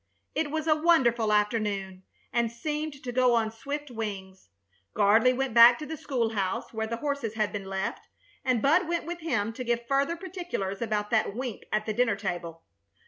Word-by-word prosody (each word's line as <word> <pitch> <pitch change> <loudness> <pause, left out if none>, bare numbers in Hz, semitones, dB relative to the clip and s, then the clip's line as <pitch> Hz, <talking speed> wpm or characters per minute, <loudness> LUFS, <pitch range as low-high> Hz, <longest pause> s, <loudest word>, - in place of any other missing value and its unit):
It 315 -1 -1
was 315 +1 -2
a 310 -2 +4
wonderful 260 -9 +3
afternoon, 205 -3 0 0.3
and 235 -1 +1
seemed 295 +3 -4
to 250 - -4
go 250 -1 +3
on 220 -1 +1
swift 280 +5 -6
wings. 195 - -6 0.5
Gardley 215 +4 +5
went 260 -1 -2
back 235 +1 +9
to 305 - -6
the 320 - -5
school 255 -6 -1
house, 195 -1 -2
where 220 0 -2
the 230 +1 -3
horses 280 -5 -3
had 215 -2 0
been 200 -2 -4
left, 190 0 -4 0.4
and 255 -4 +1
Bud 320 +5 +4
went 340 -1 -1
with 345 +1 -5
him 235 -10 -1
to 255 - -5
give 235 -1 -1
further 275 +6 +1
particulars 345 - -5
about 210 -2 -1
that 215 -3 +1
wink 245 -3 -5
at 215 0 0
the 215 - -2
dinner 230 -1 +2
table. 175 -4 -5
235 Hz, 190 wpm, -28 LUFS, 210-280 Hz, 0.5 s, back